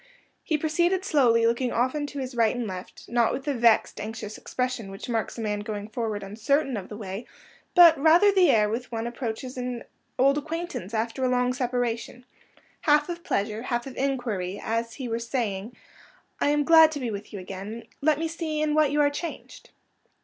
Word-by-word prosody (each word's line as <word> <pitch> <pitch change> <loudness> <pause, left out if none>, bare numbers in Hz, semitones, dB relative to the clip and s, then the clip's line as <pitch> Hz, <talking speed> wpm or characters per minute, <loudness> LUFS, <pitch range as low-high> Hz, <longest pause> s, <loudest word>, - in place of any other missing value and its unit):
He 310 - 0
proceeded 345 +5 +1
slowly, 240 -9 +4
looking 235 +2 +1
often 260 +5 0
to 285 - -9
his 260 -1 -4
right 230 -1 +2
and 245 -1 -2
left; 185 -2 -8
not 235 -1 +2
with 260 - -4
the 290 - 0
vexed, 230 -4 +3
anxious 215 0 -6
expression 250 -5 -3
which 195 +5 -8
marks 230 -1 -2
a - - -4
man 210 -1 -1
going 210 0 -5
forward 220 -2 -3
uncertain 245 +7 0
of 195 -3 -6
the 210 - -7
way, 200 +1 -6 0.5
but 340 -4 +8
rather 335 +7 +6
the 375 -4 +4
air 215 -5 +4
with 230 +4 -3
which - - -26
one 225 0 -3
approaches 240 +1 -5
as 245 -1 -4 0.3
old 275 +3 +4
acquaintance 315 - -5
after 230 +4 -2
a 255 - +2
long 250 0 +2
separation—half 245 +5 -2
of 340 0 -5
pleasure, 210 +2 -1
half 240 -1 -2
of 270 - -8
inquiry; 230 -9 -2
as 230 +1 -1
if 230 - -15
he 260 - -5
were 230 0 -2
saying, 230 -3 -3 0.6
"I - - +2
am 295 0 +2
glad 320 +1 +7
to 290 - -4
be 245 -4 -3
with 205 0 -7
you 205 - -6
again; 195 +4 -7 0.2
let 300 0 +3
me 325 +1 -1
see 320 -2 -3
in 305 0 +1
what 305 -1 +4
you 295 +1 +2
are 285 0 +3
changed." 330 +3 -7
245 Hz, 200 wpm, -26 LUFS, 220-290 Hz, 0.6 s, but